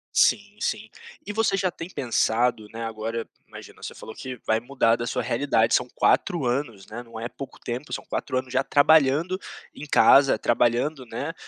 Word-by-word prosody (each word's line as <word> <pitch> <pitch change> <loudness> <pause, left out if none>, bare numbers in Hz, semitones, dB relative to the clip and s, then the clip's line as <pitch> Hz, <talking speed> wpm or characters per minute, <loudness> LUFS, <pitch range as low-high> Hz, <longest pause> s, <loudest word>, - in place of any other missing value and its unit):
Sim - - +2
sim. - - -2 0.4
E 210 - -5
você 210 -3 +1
já 185 -2 0
tem 165 +2 -8
pensado, 115 - 0
né, 115 0 -6
agora, 115 +1 -4 0.2
imagina - - -13
você - - -7
falou 110 - -10
que 130 +1 -7
vai 110 0 +2
mudar 120 -2 +1
da 120 0 -4
sua - - -2
realidade, 115 -3 +1
são 125 - +2
4 170 -9 +2
anos, 120 -5 -2
né, 115 +3 -8
não 115 -2 -10
é 115 - -3
pouco 135 +2 -10
tempo, 125 +5 -6
são - - -4
4 130 - -3
anos 130 0 -4
já 135 - +2
trabalhando 155 +5 +3 0.3
em 150 - -9
casa, 140 -1 +6
trabalhando, 120 +4 +1
né, 115 +8 -4
125 Hz, 185 wpm, -25 LUFS, 115-145 Hz, 0.4 s, casa